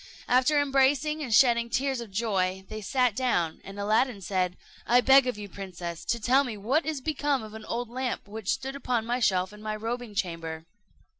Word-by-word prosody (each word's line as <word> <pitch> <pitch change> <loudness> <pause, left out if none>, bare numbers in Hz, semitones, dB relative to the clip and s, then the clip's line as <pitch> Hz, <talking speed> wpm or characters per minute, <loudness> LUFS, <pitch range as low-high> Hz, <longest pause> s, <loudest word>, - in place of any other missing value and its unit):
After 260 +4 +4
embracing 285 +2 +2
and 260 -6 -4
shedding 235 0 +5
tears 265 +1 0
of 230 - -8
joy, 190 -3 -1
they 215 0 -6
sat 250 +1 +1
down, 175 -10 0
and 195 +1 -9
Aladdin 215 +2 +1
said, 185 -1 -1 0.3
"I 245 +1 +6
beg 265 +1 +6
of 250 - -2
you, 205 -1 -7
princess, 175 -4 -7
to 235 - 0
tell 255 +5 +4
me 235 -5 -5
what 265 +11 0
is 305 -4 -2
become 290 -3 0
of 215 -1 -10
an 220 0 -9
old 240 +1 -3
lamp 250 -1 -4
which 215 -1 -6
stood 270 +1 -1
upon 245 -5 -1
a 250 +1 0
shelf 185 -2 +1
in 210 - -12
my 215 0 -3
robing 230 0 -5
chamber." 165 -4 -3
230 Hz, 200 wpm, -27 LUFS, 200-260 Hz, 0.3 s, I